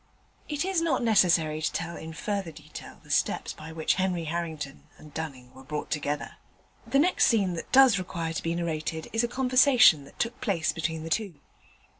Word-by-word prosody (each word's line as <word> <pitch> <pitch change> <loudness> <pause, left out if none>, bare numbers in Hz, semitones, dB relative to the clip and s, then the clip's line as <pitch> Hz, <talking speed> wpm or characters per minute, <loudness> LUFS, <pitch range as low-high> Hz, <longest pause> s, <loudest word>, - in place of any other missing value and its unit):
It 295 +2 -1
is 380 -3 +1
not 310 -7 +1
necessary 170 -8 +3
to 160 - 0
tell 170 +1 -4
in 160 - -8
further 200 0 -3
detail 155 0 -11
the - - -10
steps - - 0
by 160 - -10
which 160 -1 +1
Henry 180 -3 0
Harrington 160 -3 -5
and 150 -2 -15
Dunning 135 -6 -7
were 130 - -13
brought 150 +2 -5
together. 145 -1 -3 0.5
The 275 - +2
next 345 +6 +4
scene 200 -6 +2
that 165 - -7
does 260 -6 +6
require 170 -3 -4
to 160 - -3
be 165 0 -2
narrated 160 -1 -3
is 225 +1 +2
a - - +1
conversation 250 - +5
that - - -17
took 235 +1 -3
place 195 -10 0
between 160 -1 -3
the 165 - -7
two. 195 -2 -1
170 Hz, 190 wpm, -27 LUFS, 155-225 Hz, 0.5 s, does